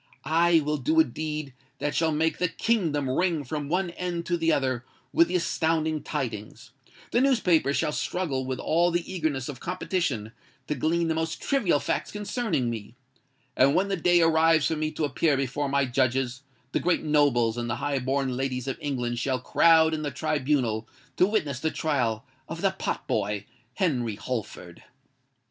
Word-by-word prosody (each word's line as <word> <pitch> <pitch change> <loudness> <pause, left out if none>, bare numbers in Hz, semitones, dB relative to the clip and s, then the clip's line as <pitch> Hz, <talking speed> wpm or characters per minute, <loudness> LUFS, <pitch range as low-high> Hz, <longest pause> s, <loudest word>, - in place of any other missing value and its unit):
I 165 +1 +4
will 150 +1 -1
do 315 - +1
a - - +8
deed 155 - -5 0.2
that 145 - -2
shall 165 -1 +2
make 160 +2 0
the 180 - +2
Kingdom 165 - 0
ring 165 +3 +1
from 145 +1 -4
one 180 +1 0
end 175 -1 -4
to 175 - 0
the 165 -1 +1
other 130 -3 0 0.3
with 335 +1 +5
the - - -2
astounding 160 -2 0
tidings:—the 130 - -5
newspapers 180 - +3
shall - - 0
struggle 150 -2 -2
with 130 0 -3
all 170 +5 +2
the 175 -1 -1
eagerness 155 -7 -1
of 135 -4 -7
competition 145 - -2 0.3
to 150 - -1
glean 165 +5 0
the 160 - +1
most 160 0 -2
trivial 210 - +1
facts - - -2
concerning 210 - -1
me;—and 130 +4 -3
when 195 +2 +2
the 195 - +1
day 175 0 +3
arrives 160 -1 +4
for 160 - +1
me 155 0 -1
to 155 0 -2
appear 145 +1 +1
before 135 +2 -1
my 140 0 +2
judges, 130 0 0 0.3
the - - +1
great 180 0 +1
nobles 140 -7 +3
and 120 -1 -3
the 110 - 0
high 140 +1 -1
born 130 0 -1
ladies 130 -1 -2
of 135 - -3
England 120 -4 -2
shall 130 +1 0
crowd 160 +5 +4
in 155 - -2
the 150 - -2
tribunal 130 -7 -1 0.3
to 185 - +4
witness 150 -11 -1
the 160 - 0
trial 120 -9 -1 0.2
of - - -5
the - - +3
pot - - -4
boy 100 0 -1 0.3
Henry 125 - 0
Holford!" 105 -7 -6
150 Hz, 175 wpm, -26 LUFS, 130-165 Hz, 0.3 s, a